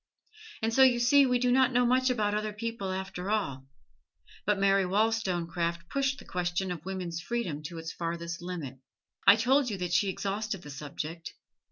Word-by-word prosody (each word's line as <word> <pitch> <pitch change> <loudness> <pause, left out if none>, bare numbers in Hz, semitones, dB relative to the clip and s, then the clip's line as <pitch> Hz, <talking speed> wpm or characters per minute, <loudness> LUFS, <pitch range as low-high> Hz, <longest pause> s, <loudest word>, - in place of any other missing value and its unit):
And 225 0 +1
so 265 - +4
you 255 -2 +6
see 270 +3 +5
we 250 -1 +3
do 250 0 +1
not 260 0 +4
know 245 0 +3
much 255 +2 +3
about 215 -4 +1
other 215 0 -2
people, 215 -3 -4
after 190 0 -4
all. 140 -12 -1 0.8
But 210 -1 +3
Mary 195 0 +3
Wollstonecraft 175 -5 0
pushed 275 0 0
the - - -12
question 180 +1 -2
of 170 -3 -6
woman's 180 -3 -4
freedom 180 -8 -3
to 170 +1 -6
its 165 0 -6
farthest 170 0 -4
limit; 165 -8 -6 0.5
I - - +10
told 255 +4 +2
you 205 - -3
that 180 -1 -3
she 195 +3 +3
exhausted 200 0 -3
the 145 - -9
subject. 150 +4 -6
195 Hz, 180 wpm, -29 LUFS, 170-230 Hz, 0.8 s, I